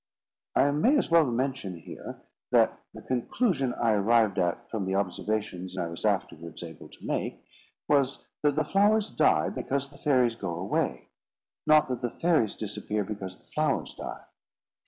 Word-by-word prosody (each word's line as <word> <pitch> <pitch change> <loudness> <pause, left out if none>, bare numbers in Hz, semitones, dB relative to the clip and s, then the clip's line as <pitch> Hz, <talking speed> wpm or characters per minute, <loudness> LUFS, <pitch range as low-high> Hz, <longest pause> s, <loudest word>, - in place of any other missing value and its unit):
I 145 - +4
may 200 - +3
as 275 - 0
well 165 -2 +6
mention 125 -6 -2
here, 80 - -9 0.3
that - - +4
the - - -11
conclusion 130 - 0
I 115 -1 +2
arrived 110 0 +3
at 90 +7 0
from 110 -4 -3
the 95 - 0
observations 95 -1 -2
I 90 - 0
was 85 - -6
afterwards 85 +2 -2
able 80 -2 -10
to - - -14
make, - - -3 0.4
was, 140 -2 +2 0.2
that 145 -1 +2
the 155 - +2
flowers 205 +2 +3
die - - +3
because 140 0 -2
the 140 - -16
fairies 125 -6 +3
go 90 -6 -4
away; - - -2 0.6
not 155 0 +6
that 125 -2 -2
the 120 - 0
fairies 160 - +1
disappear 105 0 -3
because 95 -2 -6
the - - -27
flowers 155 -2 0
die. - - -7
120 Hz, 160 wpm, -28 LUFS, 100-145 Hz, 0.6 s, well